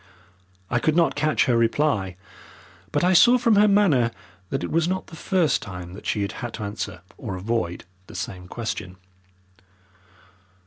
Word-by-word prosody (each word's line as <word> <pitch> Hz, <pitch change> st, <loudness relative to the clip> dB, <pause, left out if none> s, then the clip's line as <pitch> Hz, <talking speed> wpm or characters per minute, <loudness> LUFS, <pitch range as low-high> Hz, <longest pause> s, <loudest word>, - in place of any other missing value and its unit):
I 120 Hz, -, +2 dB
could 155 Hz, +5 st, +1 dB
not 170 Hz, -1 st, +3 dB
catch 155 Hz, +1 st, +2 dB
her 125 Hz, -4 st, +2 dB
reply, 115 Hz, -, +1 dB, 0.7 s
but -, -, +1 dB
I 180 Hz, +1 st, +4 dB
saw 240 Hz, +8 st, +7 dB
from 230 Hz, -3 st, +3 dB
her 210 Hz, +1 st, +6 dB
manner 185 Hz, -, +4 dB, 0.4 s
that -, -, -2 dB
it -, -, -4 dB
was 165 Hz, +1 st, +2 dB
not 185 Hz, +1 st, -2 dB
the 165 Hz, -, -12 dB
first 170 Hz, -4 st, +1 dB
time 90 Hz, -3 st, -8 dB
that 95 Hz, -, -9 dB
she 105 Hz, -, 0 dB
had 100 Hz, -, -3 dB
had 120 Hz, -2 st, -6 dB
to 110 Hz, -, -6 dB
answer 100 Hz, -2 st, -5 dB, 0.2 s
or 105 Hz, -7 st, -5 dB
avoid 90 Hz, -3 st, -2 dB, 0.2 s
the -, -, -12 dB
same 90 Hz, -1 st, -5 dB
question. 95 Hz, -4 st, -5 dB
120 Hz, 170 wpm, -24 LUFS, -, 0.7 s, saw